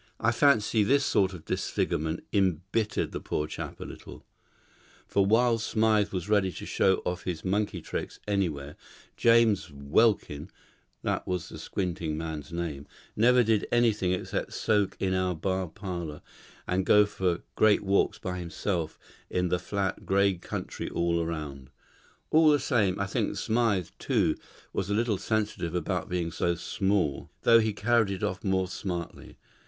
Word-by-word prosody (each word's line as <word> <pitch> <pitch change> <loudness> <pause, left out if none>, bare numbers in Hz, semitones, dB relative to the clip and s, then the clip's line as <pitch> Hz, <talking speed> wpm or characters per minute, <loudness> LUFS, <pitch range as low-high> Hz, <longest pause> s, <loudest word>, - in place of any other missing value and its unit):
I 120 - +2
fancy 120 -4 +3
this 140 +7 +3
sort 95 -1 +2
of 90 -4 -10
disfigurement 80 +2 -1
embittered 95 +3 0
the - - -4
poor 75 - -2
chap 75 - -7
a - - -5
little; - - -11 0.8
for 100 -1 +2
while 115 +2 +4
Smythe 110 -1 +2
was 90 -2 -3
ready 100 -3 +2
to - - -7
show 95 -1 +2
off 90 0 -3
his 85 -2 -4
monkey 100 +2 0
tricks - - -5
anywhere, 80 -8 -1 0.4
James 115 -7 +4
Welkin 75 +2 +1 0.5
(that - - -1
was 90 -3 -2
the - - -9
squinting 85 -5 -3
man's 80 -1 -5
name) 80 -5 -4 0.3
never 125 +3 +5
did 110 -2 +1
anything 110 -6 +2
except 90 - -3
soak 105 -3 +1
in 95 -1 0
our 95 -1 0
bar 95 +3 -1
parlour, 85 -3 -6 0.4
and 95 +1 +1
go 105 +2 +6
for 90 -4 -1
great 110 -1 +4
walks 100 0 +2
by 90 -1 -4
himself 85 -1 -3 0.3
in 90 0 0
the 90 0 +1
flat, 100 0 -2
grey 100 0 +3
country 85 - -5
all 85 0 0
round. 75 -5 -5 0.6
All 160 0 +6
the 150 - +5
same, 110 -10 +1
I 100 - +1
think 95 - -1
Smythe, 110 -7 +1
too, - - +1 0.4
was 95 - -2
a 100 - +1
little 110 -3 +1
sensitive 105 -6 -1
about 85 -3 -2
being 85 -2 -1
so 85 +2 0
small, 95 -4 -1
though 115 0 +7
he 110 -1 +1
carried 110 +1 +2
it 95 -2 -4
off 95 - -2
more 95 -2 +1
smartly. 90 -3 -6
95 Hz, 155 wpm, -28 LUFS, 85-105 Hz, 0.8 s, though